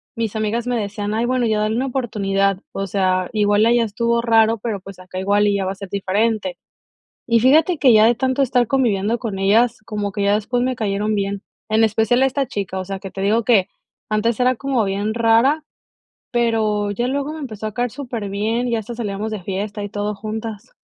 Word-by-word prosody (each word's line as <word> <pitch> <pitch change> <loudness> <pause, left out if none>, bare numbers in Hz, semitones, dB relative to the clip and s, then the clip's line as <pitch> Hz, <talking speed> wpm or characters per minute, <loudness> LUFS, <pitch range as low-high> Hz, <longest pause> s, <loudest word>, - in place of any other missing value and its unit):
mis 225 -2 -2
amigas 225 +3 -1
me 245 -1 0
decían: 205 0 -3
"Ay, 230 +2 0
bueno, 250 -1 +1
ya 215 -1 +1
dale 215 +1 0
una 260 +3 0
oportunidad". 200 -6 0
O 195 0 -3
sea, 185 -1 0
igual 205 0 +3
allá 235 0 +4
estuvo 235 +2 0
raro, 225 -1 +3
pero, 215 -3 -3
pues, 190 0 -12
acá 185 0 -7
igual 205 +2 +2
y 200 - +2
ya 195 -1 -1
va 190 - -2
a - - -13
ser 195 -1 -9
diferente. 200 0 -1 0.7
Y 230 -1 +3
fíjate 310 +6 +4
que 260 -4 +5
ya 215 0 +6
de 240 - +4
tanto 260 +3 -1
estar 245 -2 +2
conviviendo 230 -4 +1
con 205 -5 -4
ellas, 225 +4 +3
como 205 -3 -3
que 205 - -2
ya 200 +1 +3
después 245 +4 0
me 255 0 0
cayeron 210 -1 -1
bien, 200 0 -2 0.3
en 220 +1 +3
especial 225 +3 +2
esta 270 0 +1
chica. 195 -5 -4
O 185 - -3
sea, 195 0 -5
que 195 -1 -7
te 195 - -7
digo 215 +4 +2
que 210 -5 +3 0.4
antes 215 +1 0
era 250 +1 +3
como 260 -3 0
bien 200 +2 -1
rara, 235 +7 +3 0.7
pero 220 -4 +1
ya 240 +5 -1
luego 280 +3 -2
me 315 - -7
empezó 215 -7 -5
a 210 - -11
caer 245 -2 -1
súper 240 -7 -5
bien, 220 +5 -1
y 240 - -2
ya 225 - +1
hasta 230 +2 -8
salíamos 215 -1 -3
de 215 -3 -4
fiesta 205 +3 -4
y - - -4
todo 205 0 -3
juntas. 220 +1 -6
220 Hz, 220 wpm, -20 LUFS, 200-240 Hz, 0.7 s, ya